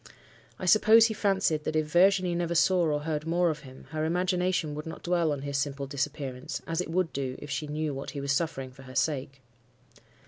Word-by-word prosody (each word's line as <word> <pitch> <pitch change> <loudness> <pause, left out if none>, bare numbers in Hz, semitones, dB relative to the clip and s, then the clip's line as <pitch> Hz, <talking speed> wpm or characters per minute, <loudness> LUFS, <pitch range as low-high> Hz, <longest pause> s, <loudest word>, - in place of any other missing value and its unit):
I - - -5
suppose 220 +4 +7
he 225 - 0
fancied 195 -7 +1
that, 155 - -3
if 155 0 +2
Virginie 180 +3 +3
never 170 0 -1
saw 180 +1 +4
or 150 -1 0
heard 155 0 -3
more 175 0 +2
of 155 - -6
him, 130 -1 -13
her 155 -1 -2
imagination 180 -1 0
would 150 +2 -6
not 160 - -8
dwell 170 -3 +1
on 140 -2 -3
his 140 -1 -1
simple 140 0 -2
disappearance, 140 -2 -4
as 165 +1 -1
it 180 - -5
would 175 0 0
do 130 -2 -3
if 145 - -9
she 150 - -2
knew 150 0 -2
what 135 +1 -6
he 145 - -5
was 140 0 -2
suffering 140 -3 -1
for 135 +1 -15
her 130 0 -12
sake. 135 -1 -1
155 Hz, 215 wpm, -28 LUFS, 140-175 Hz, -, suppose